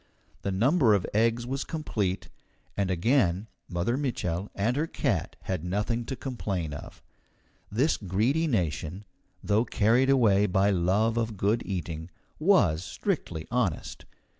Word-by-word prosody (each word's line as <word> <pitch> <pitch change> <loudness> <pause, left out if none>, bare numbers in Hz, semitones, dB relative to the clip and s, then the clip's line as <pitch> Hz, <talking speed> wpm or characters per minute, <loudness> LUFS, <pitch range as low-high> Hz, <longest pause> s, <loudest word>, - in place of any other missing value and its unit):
The 100 - -2
number 120 - +4
of 95 - 0
eggs 115 +2 +2
was 135 +2 -2
complete, 105 - -2 0.5
and 100 -2 0
again 95 0 +2 0.2
Mother 90 +8 0
Mitchel 100 - -2
and 110 +5 +1
her 155 +3 0
cat - - -1
had 90 -4 -3
nothing 105 +6 -1
to 135 - -4
complain 100 - -3
of. 70 - -10 0.7
This 130 +10 +2
Greedy 115 - +1
nation, 90 - -1 0.4
though 105 +2 +3
carried 120 +3 +3
away 105 -7 +4
by 95 +2 +3
love 100 +6 +2
of 115 -2 -1
good 105 +5 +1
eating, 85 -3 -4 0.3
was 100 - +4
strictly 80 -1 -3
honest. 115 -11 -1
105 Hz, 135 wpm, -28 LUFS, 90-120 Hz, 0.7 s, number